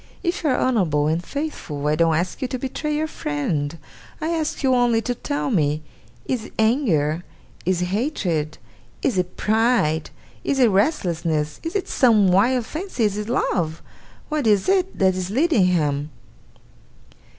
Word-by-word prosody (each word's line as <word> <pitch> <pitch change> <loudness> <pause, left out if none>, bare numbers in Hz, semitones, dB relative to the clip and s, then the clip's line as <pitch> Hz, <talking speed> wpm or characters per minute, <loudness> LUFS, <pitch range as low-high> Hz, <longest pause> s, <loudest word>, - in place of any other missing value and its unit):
If 345 -1 -1
you 305 - +2
are 255 - +2
honourable 175 - +2
and 160 +3 0
faithful, 175 - -5
I 150 - +2
don't 165 0 +3
ask 175 +3 -2
you 260 - 0
to 255 - -3
betray 295 +4 -3
your 310 +1 0
friend. 145 - -2 0.4
I 320 0 -2
ask 320 -3 -2
you 260 -1 +4
only 245 -2 +3
to 245 - -1
tell 285 +2 -3
me, 155 -6 +1 0.4
is 240 -4 -2
it - - -13
anger, 175 - +2 0.4
is 180 -1 +2
it 180 - -2
hatred, 185 - -1 0.5
is 225 -9 +1
it 180 0 -3
pride, 220 -8 +2 0.3
is 280 - 0
it 250 -3 +5
restlessness, 170 - 0
is 330 +3 -5
it 400 - -1
some 215 -7 +4
wild 230 +6 +3
fancy, 320 - -3
is 205 -2 +1
it 210 +1 -4
love, 170 -9 -1 0.4
what 300 -5 -1
is 205 -3 +3
it, 380 0 +1
that 190 -1 +3
is 185 0 -3
leading 260 - +3
him? 150 -4 0
210 Hz, 165 wpm, -22 LUFS, 165-265 Hz, 0.5 s, it